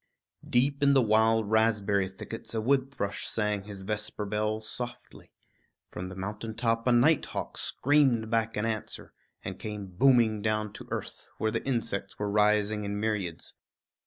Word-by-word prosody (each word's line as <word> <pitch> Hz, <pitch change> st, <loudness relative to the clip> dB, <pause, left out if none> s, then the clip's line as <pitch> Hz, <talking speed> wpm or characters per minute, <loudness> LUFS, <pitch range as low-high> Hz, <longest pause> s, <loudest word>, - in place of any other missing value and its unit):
Deep 140 Hz, +4 st, +2 dB
in 140 Hz, -1 st, +5 dB
the 135 Hz, -, +6 dB
wild 110 Hz, 0 st, +3 dB
raspberry 105 Hz, -3 st, +2 dB
thickets 115 Hz, +4 st, -8 dB
a -, -, +1 dB
wood 130 Hz, +3 st, +2 dB
thrush 100 Hz, -7 st, -3 dB
rang 105 Hz, -2 st, 0 dB
his 100 Hz, -2 st, -8 dB
vesper 105 Hz, +1 st, -3 dB
bell 105 Hz, +1 st, -1 dB
softly; 120 Hz, +3 st, -7 dB, 0.6 s
from 90 Hz, +1 st, -5 dB
the 95 Hz, -, -8 dB
mountain 105 Hz, +4 st, -5 dB
top 115 Hz, 0 st, 0 dB
a -, -, +5 dB
night 135 Hz, +6 st, +5 dB
hawk -, -, -5 dB
screamed 130 Hz, -6 st, +2 dB
back 115 Hz, -1 st, 0 dB
an 105 Hz, -, 0 dB
answer, 110 Hz, -2 st, -4 dB, 0.3 s
and 95 Hz, 0 st, -6 dB
came 105 Hz, -2 st, -5 dB
booming 110 Hz, +2 st, +3 dB
down 110 Hz, -1 st, -1 dB
to -, -, -10 dB
earth, -, -, -6 dB
where 110 Hz, -, 0 dB
the -, -, -2 dB
insects 105 Hz, -6 st, -2 dB
were 105 Hz, -1 st, -2 dB
rising 105 Hz, 0 st, +2 dB
in 100 Hz, 0 st, -3 dB
myriads. 100 Hz, -6 st, -2 dB
110 Hz, 160 wpm, -29 LUFS, 105-115 Hz, 0.6 s, the